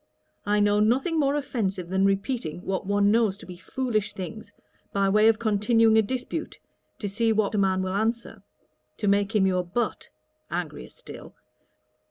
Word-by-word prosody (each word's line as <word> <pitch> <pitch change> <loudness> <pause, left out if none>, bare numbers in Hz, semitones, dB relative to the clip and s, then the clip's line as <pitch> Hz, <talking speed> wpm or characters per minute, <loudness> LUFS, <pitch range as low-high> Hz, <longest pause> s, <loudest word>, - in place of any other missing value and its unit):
I 210 0 +2
know 205 0 +3
nothing 265 +10 +2
more 280 -1 +2
offensive 195 -11 -2
than 190 +1 +2
repeating 195 - -2
what 190 0 -3
one 205 0 +3
knows 220 -3 +2
to - - -13
be 180 - -9
foolish 215 +4 -2
things, 205 +2 -8 0.4
by 200 0 +1
way 215 +2 +4
of 225 -1 +4
continuing 225 +1 +3
a 220 - +6
dispute, 260 +8 -4 0.4
to 210 - -4
see 225 +3 0
what 215 -1 +1
a 210 - +1
man 190 -1 +1
will 185 0 -3
answer, 225 +1 -2 0.6
to 210 - -2
make 200 +2 +2
him 200 -2 +4
your 185 -1 +1
butt!' 195 +7 -3 0.4
(angrier - - -5
still.) - - -12
210 Hz, 170 wpm, -26 LUFS, 195-230 Hz, 0.6 s, a